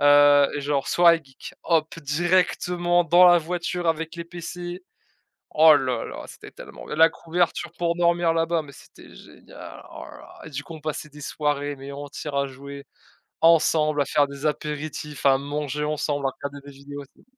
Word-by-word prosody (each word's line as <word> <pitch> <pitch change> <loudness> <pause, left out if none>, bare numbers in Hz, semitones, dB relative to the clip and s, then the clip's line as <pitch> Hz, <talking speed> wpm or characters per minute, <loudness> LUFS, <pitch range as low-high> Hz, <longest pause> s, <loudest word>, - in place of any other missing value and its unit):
Heu 145 0 +6
et - - -3
genre: 140 -1 -1
«Soirée 170 -1 +5
geek», 135 -1 -12
hop, 165 0 0
directement 175 +2 +1
dans 175 +2 +6
la 175 0 +7
voiture 175 +1 -3
avec 165 +1 -2
les 170 - -6
PC, 175 +1 -7 0.7
oh 155 0 +7
là 130 -4 -1
là, - - -8
c'était - - -12
tellement - - -12
bien, - - -5
la 165 +1 +6
couverture 170 0 -2
pour 170 -1 0
dormir 170 -1 +2
là-bas, 165 0 0
mais 145 -2 -13
c'était - - -16
génial, - - -13
oh - - -9
là - - -12
là. - - -15 0.2
Et - - -9
du 145 0 -5
coup, 165 - -10
on 160 - -10
passait 155 0 -5
des 150 +1 -13
soirées, 145 0 -2
mais 135 +1 -9
entières, 145 +1 -7
à 140 0 +1
jouer 140 +1 -10 0.6
ensemble, 155 -2 +4
à - - +1
faire 145 +1 +2
des 140 +1 -8
apéritifs, 150 0 -4
à 135 -1 +5
manger 145 +1 -4
ensemble, 150 -2 -1
à 135 - -2
regarder 140 +1 -8
des 140 - -10
vidéos, 140 +1 -10
c'était - - -24
150 Hz, 185 wpm, -24 LUFS, 140-170 Hz, 0.7 s, la